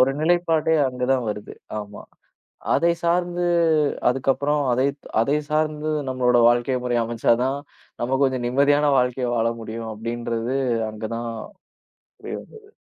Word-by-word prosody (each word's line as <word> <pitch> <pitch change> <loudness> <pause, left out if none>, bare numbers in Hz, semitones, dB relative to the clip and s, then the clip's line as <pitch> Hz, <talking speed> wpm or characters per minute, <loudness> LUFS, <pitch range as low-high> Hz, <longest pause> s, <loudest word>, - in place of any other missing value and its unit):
ஒரு, 130 +1 +5
நிலைப்பாடே 165 -1 +2 0.2
அங்க 125 -1 -3
தான் 125 -2 0
வருது. 105 0 -5 0.2
ஆமா, 105 0 -8 0.7
அதை 170 0 +3
சார்ந்து 175 +1 +1 0.6
அதுக்கப்புறம் 135 +3 +1
அதை 130 +2 +2 0.4
அதை 140 +5 +2
சார்ந்து 155 0 0 0.2
நம்மளோட 125 -1 +2
வாழ்க்கை 120 +2 +1
முறை 120 -1 0
அமைச்சா 115 0 +2
தான், 135 +2 -1 0.4
நம்ம 130 +3 0
கொஞ்சம் 130 -2 0
நிம்மதியான 145 +3 +3
வாழ்க்கை 125 0 0
வாழ 115 0 +2
முடியும், 110 0 -6
அப்படின்றது 115 +2 -3 0.4
அங்க 110 +1 -7
தான் 115 0 -4 0.9
புரிய - - -6
வந்தது. 435 -2 -16
130 Hz, 130 wpm, -23 LUFS, 120-150 Hz, 0.9 s, ஒரு